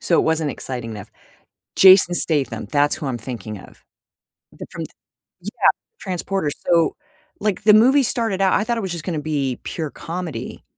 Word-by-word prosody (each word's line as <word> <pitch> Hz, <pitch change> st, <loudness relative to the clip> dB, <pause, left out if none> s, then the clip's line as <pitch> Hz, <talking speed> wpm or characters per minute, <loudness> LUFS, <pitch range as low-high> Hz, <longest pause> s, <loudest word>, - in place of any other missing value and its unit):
So 170 Hz, -, +1 dB
it -, -, +4 dB
wasn't 160 Hz, -2 st, 0 dB
exciting 125 Hz, -4 st, -5 dB
enough. 105 Hz, -3 st, -9 dB, 0.7 s
Jason 185 Hz, -2 st, +7 dB
Statham, 150 Hz, -5 st, +2 dB
that's 145 Hz, 0 st, +1 dB
who 150 Hz, -, -6 dB
I'm 130 Hz, -3 st, -3 dB
thinking 110 Hz, -3 st, -7 dB
of. -, -, -17 dB, 0.7 s
The -, -, -10 dB
from -, -, -6 dB
the -, -, -10 dB, 0.5 s
yeah, -, -, +1 dB, 0.3 s
Transporter, 185 Hz, -3 st, -2 dB, 0.2 s
so, 170 Hz, -2 st, +2 dB, 0.4 s
like, 210 Hz, -2 st, -2 dB
the 210 Hz, -, +6 dB
movie 260 Hz, +6 st, +5 dB
started 225 Hz, -5 st, -1 dB
out 190 Hz, -1 st, +3 dB
I -, -, +2 dB
thought 235 Hz, +1 st, -2 dB
it -, -, -2 dB
was 190 Hz, -3 st, -4 dB
just 170 Hz, -2 st, -5 dB
gonna 170 Hz, -5 st, -2 dB
be 140 Hz, -4 st, -2 dB
pure 160 Hz, -3 st, -4 dB
comedy 170 Hz, -1 st, -7 dB
165 Hz, 180 wpm, -20 LUFS, 145-195 Hz, 0.7 s, Jason